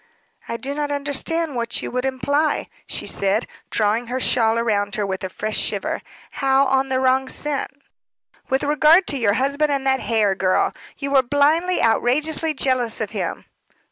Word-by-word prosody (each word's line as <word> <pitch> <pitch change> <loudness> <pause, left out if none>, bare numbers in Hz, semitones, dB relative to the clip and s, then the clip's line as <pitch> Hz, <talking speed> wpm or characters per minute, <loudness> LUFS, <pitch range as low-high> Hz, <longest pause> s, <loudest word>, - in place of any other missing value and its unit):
"I 230 - -3
do 275 +3 -4
not 295 0 -2
understand 290 +2 -2
what 235 0 -2
you - - -4
would 250 +1 -2
imply," 285 +4 0 0.2
she - - -3
said, 200 +3 0 0.2
drawing 220 +2 0
her 255 +2 -2
shawl 225 -3 +2
round 205 -3 0
her 210 - -1
with 190 -1 -4
a 190 - -3
fresh 215 +3 -2
shiver. - - -2 0.4
"How 270 0 +4
on 265 0 +1
the 260 0 +1
wrong 260 0 +2
scent?" 295 -2 -2 0.8
"With 265 +1 +1
regard 300 +5 +5
to 280 - -1
your 205 -4 +2
husband 280 +5 +1
and 275 -1 -1
that 265 0 +2
Hare 220 -5 +1
girl. 185 -1 +1 0.2
You 280 -1 -4
were 275 -1 +6
blindly, 295 +7 +2
outrageously 300 +7 +1
jealous 255 -4 0
of - - -3
him." - - -4
265 Hz, 170 wpm, -21 LUFS, 230-285 Hz, 0.8 s, were